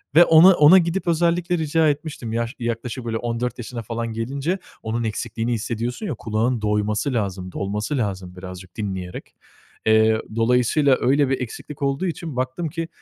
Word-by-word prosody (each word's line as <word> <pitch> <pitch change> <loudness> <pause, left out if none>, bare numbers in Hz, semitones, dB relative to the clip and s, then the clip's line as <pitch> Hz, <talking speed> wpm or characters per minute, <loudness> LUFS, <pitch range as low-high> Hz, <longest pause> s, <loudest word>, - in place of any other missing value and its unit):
ve 175 +2 +9
ona 165 +4 +8
ona 150 +5 +8
gidip 175 +1 0
özellikle 175 +1 +1
rica 160 0 +2
etmiştim 145 -6 -4
yaş 115 +3 -2
yaklaşık 120 +1 -4
böyle 115 -1 -1
14 120 +1 -3
yaşına 120 -1 -6
falan 115 +1 -4
gelince. 140 - -2 0.2
Onun 115 +2 -2
eksikliğini 115 +2 -2
hissediyorsun 115 - -3
ya. 165 - -2
Kulağın 115 +2 -1
doyması 105 +5 0
lazım, 95 -5 -2
dolması 105 - -2
lazım 95 -6 -3
birazcık 90 0 -10
dinleyerek. 95 -4 -5 0.5
Eee, 110 0 +4
dolayısıyla 125 +4 +3
öyle 140 +1 +3
bir 135 - 0
eksiklik 135 +4 -7
olduğu 140 +5 0
için 165 -4 -4
baktım 130 +6 -2
ki 165 +1 -4
120 Hz, 155 wpm, -22 LUFS, 110-150 Hz, 0.5 s, ve